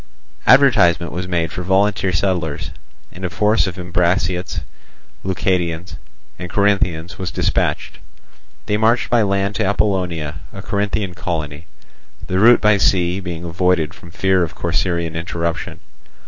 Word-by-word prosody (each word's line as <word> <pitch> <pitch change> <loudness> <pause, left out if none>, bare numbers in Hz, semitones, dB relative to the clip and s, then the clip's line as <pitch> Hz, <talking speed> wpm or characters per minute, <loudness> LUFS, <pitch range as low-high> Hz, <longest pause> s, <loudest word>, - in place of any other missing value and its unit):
Advertisement 120 - +5
was 90 +2 -4
made 85 -3 -1
for 90 - -5
volunteer 95 +1 +1
settlers, 85 -4 -1 0.4
and 90 - -11
a 90 - -1
force 105 +5 +2
of 95 - -5
Ambraciots, 90 -1 -1 0.6
Leucadians, 90 -2 -1 0.4
and 90 - -6
Corinthians 95 -3 0
was 95 -2 -3
dispatched. - - -1 0.7
They 105 -1 0
marched 115 +3 +2
by 120 -1 +4
land 100 0 0
to - - 0
Apollonia, 90 -7 -1
a - - -9
Corinthian 100 -2 -2
colony, 80 -3 -4 0.6
the 95 - -1
route 120 +4 +6
by 105 -1 +4
sea 90 -1 +2
being 85 -3 -6
avoided 85 -1 0
from 85 - -14
fear 95 +2 +1
of 85 - -2
Corcyraean 85 -3 -1
interruption. 85 0 -3
90 Hz, 135 wpm, -19 LUFS, 85-100 Hz, 0.7 s, route